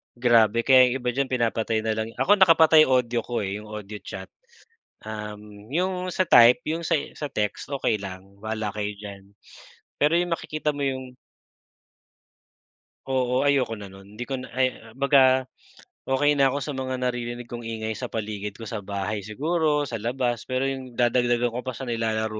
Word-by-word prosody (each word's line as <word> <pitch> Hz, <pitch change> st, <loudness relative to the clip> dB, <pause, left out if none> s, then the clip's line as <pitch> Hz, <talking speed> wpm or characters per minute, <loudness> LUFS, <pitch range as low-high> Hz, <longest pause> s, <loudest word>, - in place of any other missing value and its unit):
Grabe, 115 Hz, -2 st, +4 dB
kaya 130 Hz, 0 st, +7 dB
'yong 125 Hz, -, -1 dB
iba 125 Hz, -, +1 dB
diyan, 135 Hz, +2 st, -1 dB
pinapatay 115 Hz, -2 st, 0 dB
na 110 Hz, -, 0 dB
lang 110 Hz, 0 st, -2 dB
ako 205 Hz, +1 st, +3 dB
nakapatay 160 Hz, -4 st, +7 dB
audio 125 Hz, -2 st, +2 dB
ko 120 Hz, -2 st, -3 dB
eh, 100 Hz, +2 st, -3 dB
'yong 105 Hz, -, -12 dB
audio 105 Hz, -1 st, -7 dB
chat, -, -, -9 dB, 0.7 s
um, 105 Hz, -1 st, -8 dB
'yong 180 Hz, +4 st, -1 dB
sa 185 Hz, +1 st, 0 dB
type, 125 Hz, 0 st, +6 dB
'yong 160 Hz, +2 st, -2 dB
sa 165 Hz, -, +2 dB, 0.2 s
sa 150 Hz, -, -5 dB
text, 105 Hz, +1 st, -3 dB
okey 125 Hz, -6 st, -1 dB
lang, 100 Hz, 0 st, -10 dB
bala 110 Hz, -1 st, -3 dB
kayo 105 Hz, -1 st, -3 dB
diyan. 100 Hz, -1 st, -10 dB, 0.8 s
Pero 150 Hz, +3 st, +4 dB
'yong 175 Hz, 0 st, 0 dB
makikita 155 Hz, -2 st, -2 dB
mo 145 Hz, -, -7 dB
'yong 130 Hz, -1 st, -3 dB, 1.9 s
Oo, 130 Hz, 0 st, 0 dB
ayoko 130 Hz, -5 st, +2 dB
na 100 Hz, -2 st, -10 dB
nun 100 Hz, +2 st, -15 dB
'di 120 Hz, -, -3 dB
ko 135 Hz, -, -5 dB
na 130 Hz, -, -9 dB
ay 130 Hz, -, +4 dB, 0.3 s
baga 130 Hz, -2 st, +4 dB, 0.6 s
okey 145 Hz, +2 st, +2 dB
na 135 Hz, -, +6 dB
ako 140 Hz, +2 st, -1 dB
sa 150 Hz, -, -4 dB
mga 130 Hz, -1 st, -3 dB
naririnig 120 Hz, -1 st, -3 dB
kong 120 Hz, -1 st, -7 dB
ingay 110 Hz, -1 st, -4 dB
sa -, -, -4 dB
paligid 105 Hz, -2 st, -5 dB
ko 115 Hz, -, -10 dB
sa 110 Hz, -, -4 dB
bahay 100 Hz, +1 st, -3 dB
siguro 150 Hz, +6 st, 0 dB
sa 115 Hz, -6 st, -4 dB
labas 120 Hz, 0 st, -2 dB
pero 130 Hz, 0 st, -1 dB
yung 130 Hz, -3 st, -4 dB
dadagdagan 120 Hz, 0 st, +2 dB
ko 120 Hz, -, -4 dB
pa 130 Hz, -1 st, -4 dB
sa 135 Hz, -, -7 dB
nilalaro 110 Hz, -2 st, -2 dB
120 Hz, 175 wpm, -25 LUFS, 110-135 Hz, 1.9 s, kaya